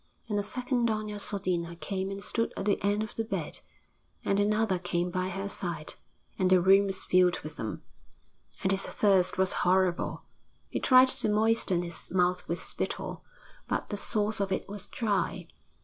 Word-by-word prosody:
And 210 Hz, -2 st, 0 dB
a -, -, +1 dB
second 245 Hz, +2 st, 0 dB
Doña 215 Hz, -1 st, -3 dB
Sodina 180 Hz, -4 st, -2 dB
came 190 Hz, 0 st, -3 dB
and 195 Hz, 0 st, -6 dB
stood 230 Hz, -, -1 dB
at 195 Hz, -, -3 dB
the 205 Hz, -, +1 dB
end 205 Hz, +1 st, +1 dB
of 220 Hz, -, -7 dB
the 225 Hz, -, -2 dB
bed, 225 Hz, -, -4 dB, 0.7 s
and 200 Hz, -, +2 dB
another 210 Hz, -2 st, +2 dB
came 175 Hz, 0 st, -1 dB
by 185 Hz, +1 st, -1 dB
her 195 Hz, +2 st, -4 dB
side, 175 Hz, -5 st, -4 dB, 0.5 s
and 185 Hz, -1 st, +3 dB
the 185 Hz, -1 st, +6 dB
room 195 Hz, +3 st, +5 dB
was 195 Hz, -1 st, -1 dB
filled 180 Hz, -1 st, +3 dB
with 155 Hz, 0 st, -9 dB
them. 110 Hz, -, -5 dB, 0.8 s
And 190 Hz, -, +2 dB
his 195 Hz, 0 st, +1 dB
thirst 195 Hz, -3 st, +2 dB
was 190 Hz, 0 st, +2 dB
horrible; 180 Hz, -1 st, +1 dB, 0.5 s
he -, -, -2 dB
tried 255 Hz, 0 st, +6 dB
to 215 Hz, -, +3 dB
moisten 210 Hz, -4 st, +2 dB
his 170 Hz, -1 st, -5 dB
mouth 180 Hz, 0 st, +1 dB
with 170 Hz, -, -1 dB
spittle, -, -, -4 dB, 0.4 s
but -, -, -2 dB
the -, -, -1 dB
source 210 Hz, 0 st, 0 dB
of 195 Hz, -1 st, -1 dB
it 190 Hz, -, -2 dB
was 205 Hz, 0 st, -7 dB
dry. 200 Hz, -5 st, -1 dB
195 Hz, 180 wpm, -29 LUFS, 180-210 Hz, 0.8 s, the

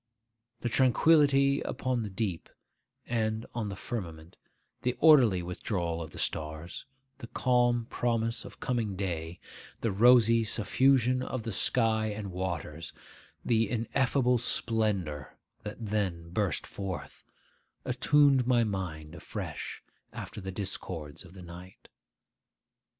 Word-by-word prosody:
The -, -, -1 dB
tranquillity 140 Hz, +2 st, +4 dB
upon 130 Hz, -2 st, -2 dB
the 105 Hz, -, -4 dB
deep, 95 Hz, -3 st, -3 dB, 0.6 s
and 110 Hz, -1 st, -1 dB
on 115 Hz, -3 st, -3 dB
the 100 Hz, -, -5 dB
firmament, 85 Hz, -7 st, -6 dB, 0.5 s
the 125 Hz, 0 st, 0 dB
orderly 125 Hz, -, +6 dB
withdrawal 85 Hz, -2 st, -3 dB
of 80 Hz, -, -6 dB
the -, -, -12 dB
stars, 80 Hz, -, -4 dB, 0.3 s
the 115 Hz, -, -8 dB
calm 120 Hz, -1 st, +2 dB
promise 115 Hz, -1 st, -1 dB
of -, -, -12 dB
coming 115 Hz, -5 st, -1 dB
day, 85 Hz, -3 st, -4 dB, 0.4 s
the 115 Hz, -, 0 dB
rosy 115 Hz, +2 st, +6 dB
suffusion 125 Hz, +3 st, +2 dB
of 130 Hz, -2 st, -4 dB
the 115 Hz, -, -4 dB
sky 110 Hz, +1 st, +2 dB
and 105 Hz, -2 st, -5 dB
waters, 85 Hz, -3 st, -4 dB, 0.5 s
the 115 Hz, -3 st, +2 dB
ineffable 125 Hz, +1 st, +1 dB
splendour 100 Hz, -, -1 dB, 0.2 s
that 105 Hz, -, -7 dB
then 100 Hz, -7 st, -2 dB
burst 95 Hz, -4 st, -1 dB
forth, 95 Hz, -2 st, -6 dB, 0.6 s
attuned 135 Hz, 0 st, +4 dB
my 120 Hz, -2 st, +4 dB
mind 90 Hz, -7 st, -4 dB
afresh -, -, -6 dB, 0.3 s
after 105 Hz, -, -7 dB
the 95 Hz, 0 st, -5 dB
discords 90 Hz, -6 st, -6 dB
of 90 Hz, 0 st, -15 dB
the 90 Hz, -, -10 dB
night. 90 Hz, +2 st, -12 dB
110 Hz, 120 wpm, -30 LUFS, 90-120 Hz, 0.6 s, orderly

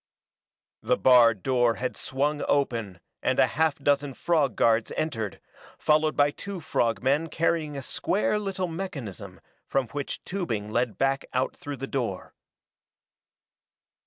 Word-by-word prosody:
The -, -, +1 dB
barred 115 Hz, -6 st, +5 dB
door 120 Hz, -3 st, +2 dB
had 130 Hz, +1 st, -3 dB
swung 145 Hz, +3 st, -1 dB
open 115 Hz, -9 st, 0 dB, 0.2 s
and -, -, +1 dB
a -, -, +6 dB
half 155 Hz, +2 st, +1 dB
dozen 140 Hz, -1 st, +1 dB
frog 150 Hz, -9 st, +1 dB
guards 115 Hz, +1 st, +2 dB
entered, 115 Hz, -10 st, -2 dB, 0.4 s
followed 155 Hz, 0 st, +2 dB
by 145 Hz, 0 st, +4 dB
two 200 Hz, +4 st, -7 dB
frog 115 Hz, -8 st, 0 dB
men 145 Hz, +5 st, +2 dB
carrying 160 Hz, -3 st, 0 dB
a 135 Hz, -, -5 dB
square 205 Hz, +9 st, 0 dB
little 195 Hz, -3 st, -2 dB
mechanism 160 Hz, -, -6 dB, 0.3 s
from 135 Hz, -4 st, 0 dB
which 145 Hz, +1 st, -5 dB
tubing 115 Hz, -, -3 dB
led 120 Hz, 0 st, 0 dB
back 135 Hz, 0 st, +1 dB
out 130 Hz, +1 st, 0 dB
through 145 Hz, -5 st, -7 dB
the 135 Hz, -, -4 dB
door. 120 Hz, -9 st, -3 dB
135 Hz, 135 wpm, -27 LUFS, 120-155 Hz, 0.4 s, a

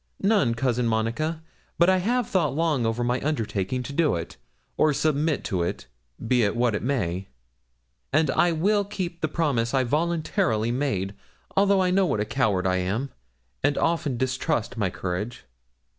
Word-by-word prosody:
'None, 195 Hz, -, +2 dB
Cousin 125 Hz, -1 st, 0 dB
Monica; 115 Hz, +9 st, -1 dB, 0.3 s
but 170 Hz, -, +5 dB
I 190 Hz, 0 st, +5 dB
have 240 Hz, +5 st, 0 dB
thought 155 Hz, -8 st, +1 dB
long 155 Hz, -7 st, +1 dB
over 115 Hz, +2 st, -1 dB
my 120 Hz, +1 st, 0 dB
undertaking 125 Hz, -4 st, -1 dB
to 140 Hz, -, -7 dB
do 155 Hz, -, +2 dB
it, 85 Hz, -1 st, -5 dB, 0.4 s
or 155 Hz, -1 st, +3 dB
submit 155 Hz, +1 st, +1 dB
to 95 Hz, -5 st, -1 dB
it, 85 Hz, -, -3 dB, 0.4 s
be 125 Hz, +1 st, +3 dB
it 100 Hz, -2 st, +1 dB
what 120 Hz, -1 st, +2 dB
it 105 Hz, -, -1 dB
may; 100 Hz, -8 st, -1 dB, 0.8 s
and 155 Hz, 0 st, +3 dB
I 175 Hz, -, +3 dB
will 200 Hz, +6 st, +2 dB
keep 185 Hz, -4 st, -5 dB
the 155 Hz, -, +1 dB
promise 140 Hz, -7 st, 0 dB
I 130 Hz, -, +3 dB
voluntarily 145 Hz, -6 st, 0 dB
made, 110 Hz, -8 st, -1 dB, 0.4 s
although 195 Hz, -1 st, +4 dB
I 180 Hz, -, +1 dB
know 190 Hz, 0 st, +3 dB
what 110 Hz, -, 0 dB
a 105 Hz, -, 0 dB
coward 105 Hz, -6 st, 0 dB
I 95 Hz, 0 st, +2 dB
am, 105 Hz, +9 st, -2 dB, 0.5 s
and 145 Hz, -, +2 dB
often 160 Hz, -6 st, 0 dB
distrust 130 Hz, -1 st, -1 dB
my 105 Hz, -5 st, 0 dB
courage.' 90 Hz, +6 st, -4 dB
135 Hz, 170 wpm, -25 LUFS, 115-165 Hz, 0.8 s, but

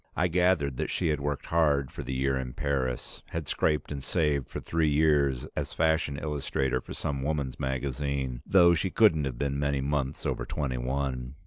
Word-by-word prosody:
I 90 Hz, +1 st, +2 dB
gathered 85 Hz, -6 st, +2 dB
that -, -, -2 dB
she -, -, 0 dB
had 75 Hz, -1 st, +1 dB
worked 70 Hz, 0 st, -3 dB
hard 75 Hz, -5 st, +2 dB
for -, -, -7 dB
the 65 Hz, +1 st, -4 dB
year 65 Hz, +1 st, +1 dB
in 65 Hz, -1 st, -3 dB
Paris, 65 Hz, -3 st, -2 dB
had 80 Hz, -3 st, -5 dB
scraped 75 Hz, -1 st, 0 dB
and 70 Hz, -2 st, -4 dB
saved 75 Hz, -3 st, 0 dB
for -, -, -5 dB
three 80 Hz, -2 st, +1 dB
years 70 Hz, -4 st, +3 dB
as -, -, -3 dB
fashion 80 Hz, -3 st, +1 dB
illustrator 70 Hz, -3 st, -1 dB
for -, -, -9 dB
some 70 Hz, -2 st, -3 dB
woman's 70 Hz, -2 st, -2 dB
magazine, 65 Hz, -1 st, -2 dB
though 85 Hz, -1 st, +6 dB
she 90 Hz, +3 st, 0 dB
couldn't 85 Hz, -9 st, +4 dB
have 65 Hz, -3 st, -4 dB
been 70 Hz, +1 st, -1 dB
many 70 Hz, -1 st, 0 dB
months 70 Hz, 0 st, -2 dB
over -, -, -1 dB
twenty 65 Hz, -4 st, -2 dB
one. 65 Hz, 0 st, -2 dB
70 Hz, 190 wpm, -28 LUFS, 65-75 Hz, -, though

